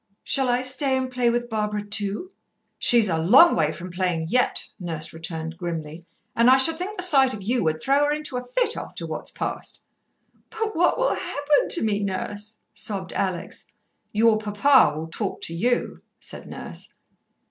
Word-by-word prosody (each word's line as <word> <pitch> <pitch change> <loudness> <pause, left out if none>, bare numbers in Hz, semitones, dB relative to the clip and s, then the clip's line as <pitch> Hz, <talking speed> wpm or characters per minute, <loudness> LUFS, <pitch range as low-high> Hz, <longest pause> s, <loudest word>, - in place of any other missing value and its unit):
"Shall 265 -2 +2
I 245 +1 +1
stay 260 +1 0
and 260 -1 -3
play 250 -1 +1
with 240 0 -1
Barbara 210 -2 -2
too?" 205 - -1 0.5
"She's 235 -3 +4
a 165 -3 0
long 255 - +6
way 155 -2 +1
from 180 +3 -8
playing 175 -3 -2
yet," 250 +4 +1
Nurse 165 -3 -4
returned 165 0 -6
grimly. 165 -1 -6 0.3
"And 235 +2 +5
I 260 - +7
should 320 +5 +6
think 390 +4 -5
the 360 - +1
sight 270 -8 +4
of 200 - -9
you 240 +3 0
would 155 -1 0
throw 275 - +2
her 290 - 0
into 300 -3 -2
a 250 - -3
fit, 470 - 0
after - - -7
what's - - -5
passed." - - -5 0.7
"But 440 -1 -4
what 350 +2 +2
will - - +1
happen 290 +1 0
to 340 - +3
me, 210 -2 0
Nurse?" 205 +2 -4 0.2
sobbed 200 -3 -3
Alex. 185 -3 -3 0.4
"Your 220 0 +3
Papa 210 - +3
will 160 - -4
talk 165 - -4
to 165 - -4
you," 240 +8 -1 0.2
said - - -9
Nurse. - - -8
220 Hz, 180 wpm, -24 LUFS, 180-265 Hz, 0.7 s, I